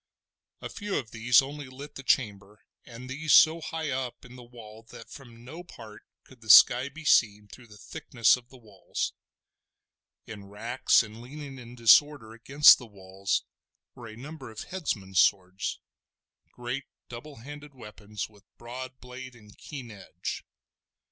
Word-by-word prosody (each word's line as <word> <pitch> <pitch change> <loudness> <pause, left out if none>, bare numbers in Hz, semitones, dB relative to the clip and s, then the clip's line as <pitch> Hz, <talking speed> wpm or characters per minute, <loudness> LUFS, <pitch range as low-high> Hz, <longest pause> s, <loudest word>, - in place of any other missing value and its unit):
A - - -6
few 205 -1 -5
of 115 -5 -5
these 120 +4 +4
only 145 0 -8
lit 140 +3 -11
the - - -9
chamber, 105 -6 -1 0.2
and 120 +1 -11
these 150 +4 -1
so 160 +1 +6
high 160 -3 -4
up 130 -2 -5
in 125 0 -13
the 125 - -11
wall 115 -3 -13
that 115 - -13
from 120 -4 -13
no 160 +7 -9
part 110 -10 -13 0.2
could 130 -3 -19
the 110 - -13
sky 125 +5 +8
be 155 +3 -12
seen 105 -6 +3
through 120 +3 -14
the 105 -1 -15
thickness 115 +2 +1
of 125 -1 -14
the 130 - -15
walls. 105 -6 -5 1.1
In 105 -3 -10
racks, 115 +6 +1
and 110 +1 -11
leaning 135 +1 -9
in 120 0 -12
disorder 120 0 +4
against 140 +6 +6
the 125 - -11
walls, 95 -1 -3 0.5
were 120 -3 -11
a 110 0 -11
number 140 +1 -9
of 110 - -9
headsmen's 100 - -3
swords, 95 +1 +1 0.7
great 125 +3 -5 0.2
double 125 +5 -10
handed 145 +3 -11
weapons 105 -3 -8
with 105 -2 -22
broad 130 +2 -9
blade 125 0 -10
and 105 -3 -17
keen 130 -6 -9
edge. 90 -4 -7
120 Hz, 160 wpm, -27 LUFS, 110-135 Hz, 1.1 s, sky